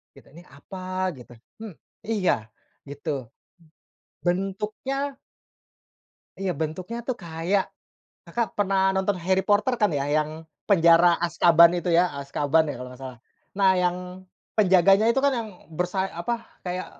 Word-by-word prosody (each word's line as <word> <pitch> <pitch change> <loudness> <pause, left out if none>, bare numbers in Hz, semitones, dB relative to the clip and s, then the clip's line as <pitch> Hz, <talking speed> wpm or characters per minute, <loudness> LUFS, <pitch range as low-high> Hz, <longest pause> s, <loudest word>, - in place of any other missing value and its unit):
Gitu. - - -18
"Ni 170 +2 -13
apa?" 185 +5 -5
Gitu. 120 -1 -14 0.3
Hmm, 210 -7 -8 0.3
iya, 185 - 0 0.4
gitu. 140 -4 -5 1.0
Bentuknya 210 +10 -2 1.3
Iya, 190 -2 -1
bentuknya 180 +9 -4
tuh, 255 -2 -2
kayak 170 +4 0 0.6
Kakak 235 -1 -2
pernah 190 -1 +2
nonton 190 +1 +1
Harry 190 0 +2
Potter, 210 +5 +3
kan 210 - +3
ya, 140 - -1
yang 155 0 0 0.4
penjara 170 -2 +6
Azkaban 170 0 +6
itu 175 - -4
ya? 180 - +5 0.2
Azkaban 145 +3 +1
ya, - - -3
kalau 125 0 -7
nggak 125 - -14
salah. 130 -3 -8 0.4
Nah, 195 -1 +5
yang 180 0 +1 0.6
penjaganya 195 +2 +5
itu 270 - +1
kan 280 - +5
yang 225 -2 -4 0.2
bersay 180 +3 -1
apa, 230 +8 -3 0.2
kayak 180 +1 -3
185 Hz, 135 wpm, -25 LUFS, 165-200 Hz, 1.3 s, penjara